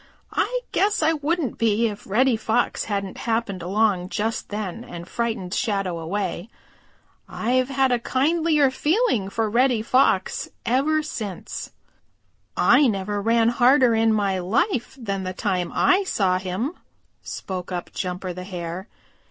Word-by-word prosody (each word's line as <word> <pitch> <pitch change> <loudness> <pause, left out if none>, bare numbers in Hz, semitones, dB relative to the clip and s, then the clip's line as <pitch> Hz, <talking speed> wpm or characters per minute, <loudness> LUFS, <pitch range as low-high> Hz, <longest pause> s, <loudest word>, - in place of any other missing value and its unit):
I - - 0
guess 410 -4 +2
I 320 +1 +4
wouldn't 305 -3 -1
be 225 0 +2
if 205 -2 -7
Reddy 245 +5 +3
Fox 225 +2 0
hadn't 200 -3 -3
happened 225 -5 -1
along 190 0 +1
just 220 +2 -2
then 210 +1 -4
and 175 -7 -9
frightened 225 -6 -3
Shadow 195 -7 -1
away. 185 +3 -3 0.8
I've 255 +3 0
had 270 -1 +2
a 245 - +2
kindlier 295 +3 +2
feeling 300 - +1
for 225 +2 -1
Reddy 240 0 +2
Fox 235 -6 +2 0.2
ever 300 +6 +2
since." 210 - -6 0.9
"I 290 - +5
never 205 -1 -1
ran 230 +1 +3
harder 245 +1 +4
in 225 0 +3
my 200 -3 +1
life 250 - 0
than 200 -5 -3
the 185 0 -4
time 185 -2 -1
I 380 +2 +3
saw 185 - +1
him," 195 - -3 0.5
spoke 185 -1 -6
up 175 -1 -4
Jumper 180 0 -3
the 180 +1 -7
Hare. 180 +1 -6
220 Hz, 140 wpm, -23 LUFS, 190-260 Hz, 0.9 s, I